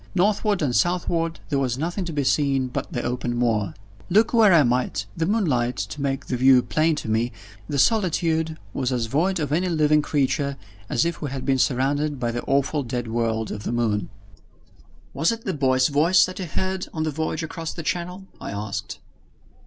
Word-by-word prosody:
Northward 205 Hz, -1 st, +2 dB
and 125 Hz, -4 st, 0 dB
southward, 170 Hz, -2 st, 0 dB
there 140 Hz, -, +1 dB
was 125 Hz, -3 st, 0 dB
nothing 175 Hz, +6 st, -2 dB
to 170 Hz, -, -4 dB
be 145 Hz, -2 st, -1 dB
seen 135 Hz, -2 st, +1 dB
but 140 Hz, +5 st, -4 dB
the 120 Hz, -7 st, -3 dB
open 120 Hz, 0 st, -2 dB
moor. 115 Hz, -4 st, 0 dB, 0.3 s
Look 215 Hz, +7 st, +3 dB
where 225 Hz, -4 st, +6 dB
I 165 Hz, -4 st, +6 dB
might, 120 Hz, -5 st, 0 dB
with -, -, -26 dB
the 165 Hz, -, +2 dB
moonlight 140 Hz, -, +1 dB
to 105 Hz, +9 st, -4 dB
make 135 Hz, -1 st, -2 dB
the 125 Hz, -, -2 dB
view 130 Hz, 0 st, +6 dB
plain 160 Hz, +1 st, +1 dB
to 150 Hz, -, -5 dB
me, 115 Hz, +2 st, 0 dB, 0.4 s
the 145 Hz, -, -1 dB
solitude 160 Hz, -, +1 dB, 0.2 s
was 130 Hz, -1 st, -1 dB
as 120 Hz, -2 st, 0 dB
void 170 Hz, +10 st, 0 dB
of 145 Hz, -3 st, -2 dB
any 180 Hz, +4 st, +1 dB
living 150 Hz, -2 st, +3 dB
creature 140 Hz, -1 st, 0 dB, 0.3 s
as 120 Hz, -, +2 dB
if 170 Hz, -2 st, -3 dB
we 145 Hz, -, -3 dB
had 130 Hz, -1 st, -5 dB
been 135 Hz, -1 st, +2 dB
surrounded 140 Hz, +3 st, +1 dB
by 120 Hz, -1 st, -1 dB
the 120 Hz, +1 st, -3 dB
awful 140 Hz, +2 st, +1 dB
dead 120 Hz, -2 st, -4 dB
world 110 Hz, -1 st, -1 dB
of 105 Hz, -, -5 dB
the -, -, -3 dB
moon. 110 Hz, -4 st, 0 dB, 1.0 s
"Was 160 Hz, +8 st, +2 dB
it 230 Hz, 0 st, -6 dB
the 190 Hz, -, -1 dB
boy's 130 Hz, -3 st, +3 dB
voice 160 Hz, +6 st, +4 dB
that 185 Hz, -, -7 dB
you 185 Hz, -, -3 dB
heard 185 Hz, +3 st, -2 dB
on 155 Hz, -, -2 dB
the 155 Hz, -, -1 dB
voyage 160 Hz, +2 st, -2 dB
across 165 Hz, 0 st, -5 dB
the 165 Hz, -, -7 dB
Channel?" 180 Hz, +3 st, -3 dB, 0.2 s
I -, -, -5 dB
asked. 100 Hz, 0 st, -5 dB
145 Hz, 200 wpm, -24 LUFS, 125-165 Hz, 1.0 s, where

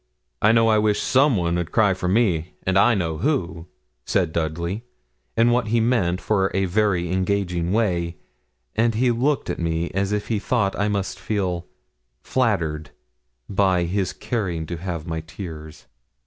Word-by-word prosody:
'I 110 Hz, +2 st, +5 dB
know 115 Hz, 0 st, +4 dB
I 110 Hz, -1 st, +4 dB
wish 105 Hz, -1 st, +2 dB
some 135 Hz, -2 st, +3 dB
one 85 Hz, -1 st, 0 dB
'ud 85 Hz, -2 st, -4 dB
cry 105 Hz, -4 st, +4 dB
for 90 Hz, -1 st, -3 dB
me, 90 Hz, -5 st, +1 dB
and 95 Hz, -, +1 dB
I 115 Hz, +5 st, +5 dB
know 80 Hz, -5 st, -2 dB
who,' 85 Hz, -, -1 dB, 0.4 s
said 90 Hz, -5 st, 0 dB
Dudley, 85 Hz, +6 st, -2 dB, 0.5 s
in 115 Hz, +1 st, +5 dB
what 120 Hz, -1 st, +1 dB
he 115 Hz, +2 st, +2 dB
meant 110 Hz, -7 st, +1 dB
for 95 Hz, -2 st, +1 dB
a 95 Hz, 0 st, +2 dB
very 90 Hz, -3 st, +1 dB
engaging 95 Hz, -2 st, 0 dB
way, 90 Hz, -6 st, 0 dB, 0.6 s
and 115 Hz, 0 st, +2 dB
he 125 Hz, +2 st, +3 dB
looked 135 Hz, +5 st, 0 dB
at -, -, -3 dB
me 85 Hz, 0 st, -1 dB
as 95 Hz, +2 st, -1 dB
if 105 Hz, 0 st, -2 dB
he 110 Hz, -3 st, +1 dB
thought 100 Hz, -3 st, 0 dB
I 105 Hz, -, 0 dB
must 100 Hz, -2 st, -2 dB
feel 90 Hz, -5 st, -2 dB, 0.6 s
flattered 85 Hz, -12 st, 0 dB, 0.6 s
by 95 Hz, -3 st, +2 dB
his 95 Hz, +2 st, -1 dB
caring 100 Hz, -8 st, -3 dB
to 85 Hz, +2 st, -5 dB
have 85 Hz, -2 st, -5 dB
my 80 Hz, -1 st, -3 dB
tears. 80 Hz, -3 st, -9 dB
95 Hz, 165 wpm, -23 LUFS, 85-110 Hz, 0.6 s, I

